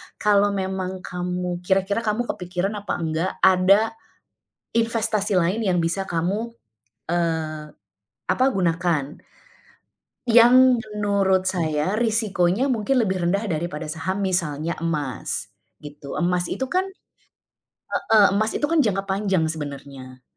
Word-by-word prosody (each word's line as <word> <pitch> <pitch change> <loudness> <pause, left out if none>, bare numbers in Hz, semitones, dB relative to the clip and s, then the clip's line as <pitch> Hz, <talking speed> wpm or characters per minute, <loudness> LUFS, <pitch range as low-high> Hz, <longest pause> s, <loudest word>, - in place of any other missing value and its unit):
kalau 205 -1 +3
memang 190 -1 -3
kamu 180 0 -3
kira-kira 190 +3 0
kamu 225 +1 -1
kepikiran 180 -3 -3
apa 205 - -4
enggak, 165 +2 -2
ada 195 +4 +5 0.8
investasi 220 -3 +1
lain 185 +7 0
yang 185 -4 +1
bisa 170 +3 -1
kamu, 190 +6 -2 0.6
eee, 160 -3 -2 0.6
apa, 220 +8 +3
gunakan 170 -5 0 1.1
yang 245 +2 +7 0.2
menurut 195 -2 +1
saya 165 +1 -1
risikonya 220 0 +1
mungkin 250 +2 +1
lebih 190 -5 -1
rendah 200 +5 0
daripada 160 -2 -3
saham, 185 +5 -3
misalnya 170 -4 -1
emas, 150 -5 -3 0.3
gitu. 145 -1 -9
Emas 180 0 +1
itu 265 - -2
kan 370 +5 +1 1.1
heeh, 215 -2 +4
emas 215 +2 0
itu - - -2
kan 335 - +2
jangka 205 -9 +2
panjang 190 -3 +1
sebenarnya. 140 -4 -8
185 Hz, 115 wpm, -23 LUFS, 170-210 Hz, 1.1 s, yang